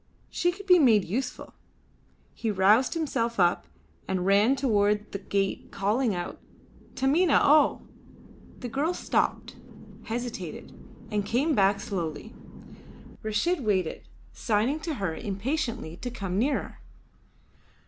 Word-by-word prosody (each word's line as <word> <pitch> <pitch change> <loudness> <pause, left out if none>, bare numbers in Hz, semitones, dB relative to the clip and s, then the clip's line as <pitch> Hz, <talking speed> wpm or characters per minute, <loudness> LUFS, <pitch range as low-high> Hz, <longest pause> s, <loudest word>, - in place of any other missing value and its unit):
She 350 - +1
could 405 +3 -11
be 360 -2 +6
made 225 - +5
useful. 250 +8 -4 0.8
He 225 - -3
roused 210 - +3
himself 235 -8 -1
up 175 -1 +2 0.4
and 185 -1 -1
ran 205 +7 +4
towards 210 -5 +1
the 200 - -4
gate 195 0 -2
calling 210 +3 0
out, 175 0 -5 0.6
"Taminah 285 +5 +3
O!" 295 0 +4 0.8
The 250 - -4
girl 290 +8 -1
stopped, - - -1 0.5
hesitated, 230 -7 -5 0.4
and 210 -1 0
came 260 +10 +1
back 200 -3 +3
slowly. 175 +2 -5 0.9
Reshid 280 +10 0
waited, 190 -6 0 0.3
signing 230 +7 0
to 315 -1 -4
her 195 -8 -2
impatiently 225 - -3
to 245 - -5
come 195 -6 -3
nearer. 275 +6 -1
225 Hz, 115 wpm, -27 LUFS, 195-270 Hz, 0.9 s, be